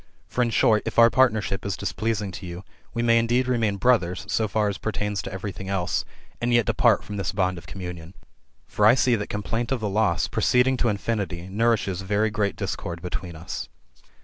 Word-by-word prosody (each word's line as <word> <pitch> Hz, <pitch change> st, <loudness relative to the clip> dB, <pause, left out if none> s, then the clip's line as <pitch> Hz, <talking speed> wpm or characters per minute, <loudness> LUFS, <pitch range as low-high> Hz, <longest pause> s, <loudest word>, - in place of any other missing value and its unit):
For 125 Hz, -, -1 dB
in 120 Hz, -, +2 dB
short, 110 Hz, -1 st, +3 dB
if -, -, -4 dB
our 115 Hz, 0 st, +7 dB
partnership 110 Hz, -6 st, +2 dB
is 100 Hz, -2 st, -3 dB
displeasing 105 Hz, 0 st, -2 dB
to 90 Hz, +1 st, -8 dB
you, 85 Hz, +2 st, -7 dB, 0.3 s
we 120 Hz, -, -2 dB
may 115 Hz, 0 st, +5 dB
indeed 120 Hz, +2 st, +1 dB
remain 115 Hz, -5 st, +1 dB
brothers 95 Hz, -5 st, +2 dB
so 110 Hz, -, +1 dB
far 105 Hz, +1 st, +1 dB
as 100 Hz, -2 st, -3 dB
pertains 105 Hz, -2 st, -2 dB
to -, -, -7 dB
every 95 Hz, +2 st, -4 dB
thing 95 Hz, +1 st, -8 dB
else, 90 Hz, -2 st, -1 dB, 0.4 s
and 120 Hz, +1 st, 0 dB
yet 120 Hz, -2 st, +4 dB
depart -, -, +3 dB
from 105 Hz, -, -6 dB
this 100 Hz, -4 st, -1 dB
bond 95 Hz, -2 st, 0 dB
of 85 Hz, -, -16 dB
communion. 90 Hz, -2 st, -8 dB, 0.5 s
For 105 Hz, -, +2 dB
I 115 Hz, -, +7 dB
see 125 Hz, -2 st, +3 dB
that 105 Hz, -2 st, -4 dB
complaint 115 Hz, +4 st, -3 dB
of 135 Hz, -, +1 dB
the 110 Hz, -, -2 dB
loss, 100 Hz, -4 st, +1 dB
proceeding 125 Hz, +1 st, +2 dB
to 120 Hz, -, +1 dB
infinity, 100 Hz, -4 st, -2 dB
nourishes 105 Hz, -3 st, +1 dB
very 105 Hz, +3 st, 0 dB
great 105 Hz, -2 st, -1 dB
discord 85 Hz, 0 st, -4 dB
between 90 Hz, -1 st, -5 dB
us." 80 Hz, +2 st, -6 dB
105 Hz, 200 wpm, -25 LUFS, 95-115 Hz, 0.5 s, our